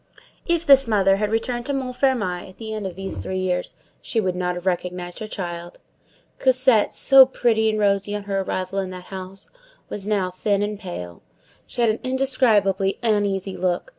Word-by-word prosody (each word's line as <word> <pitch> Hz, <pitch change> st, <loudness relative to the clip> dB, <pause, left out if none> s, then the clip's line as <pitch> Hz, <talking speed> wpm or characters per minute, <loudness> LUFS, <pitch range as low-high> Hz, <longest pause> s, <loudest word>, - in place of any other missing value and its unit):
If 340 Hz, -1 st, +1 dB
this 275 Hz, -3 st, +6 dB
mother 195 Hz, -3 st, +3 dB
had 210 Hz, 0 st, -1 dB
returned 240 Hz, +2 st, -1 dB
to 285 Hz, -, -1 dB
Montfermeil 250 Hz, -9 st, -1 dB
at 185 Hz, -, -17 dB
the 220 Hz, -1 st, -6 dB
end 210 Hz, -3 st, -3 dB
of 180 Hz, -, -8 dB
these 195 Hz, +1 st, -5 dB
three 185 Hz, -, -4 dB
years, 185 Hz, -1 st, -2 dB, 0.3 s
she 230 Hz, -, -2 dB
would 185 Hz, -4 st, -1 dB
not 180 Hz, 0 st, -1 dB
have 175 Hz, +1 st, -7 dB
recognized 180 Hz, -1 st, -3 dB
her 215 Hz, -, -5 dB
child. 175 Hz, -4 st, -6 dB, 0.6 s
Cosette, 255 Hz, -4 st, +4 dB
so 270 Hz, -1 st, +7 dB
pretty 225 Hz, -4 st, +1 dB
and 215 Hz, -, -1 dB
rosy 200 Hz, 0 st, +1 dB
on 205 Hz, -, -4 dB
her 200 Hz, -1 st, -2 dB
arrival 190 Hz, 0 st, -3 dB
in 190 Hz, -1 st, -3 dB
that 185 Hz, +1 st, -10 dB
house, 190 Hz, +1 st, -8 dB, 0.4 s
was 205 Hz, -1 st, -6 dB
now 195 Hz, -4 st, 0 dB
thin 200 Hz, +2 st, 0 dB
and 205 Hz, -1 st, -3 dB
pale. 90 Hz, -, -7 dB, 0.5 s
She 245 Hz, -, -4 dB
had 230 Hz, -2 st, +4 dB
an 215 Hz, -, -4 dB
indescribably 225 Hz, -7 st, +1 dB
uneasy 200 Hz, -3 st, 0 dB
look. 180 Hz, -, -1 dB
200 Hz, 185 wpm, -22 LUFS, 185-230 Hz, 0.6 s, so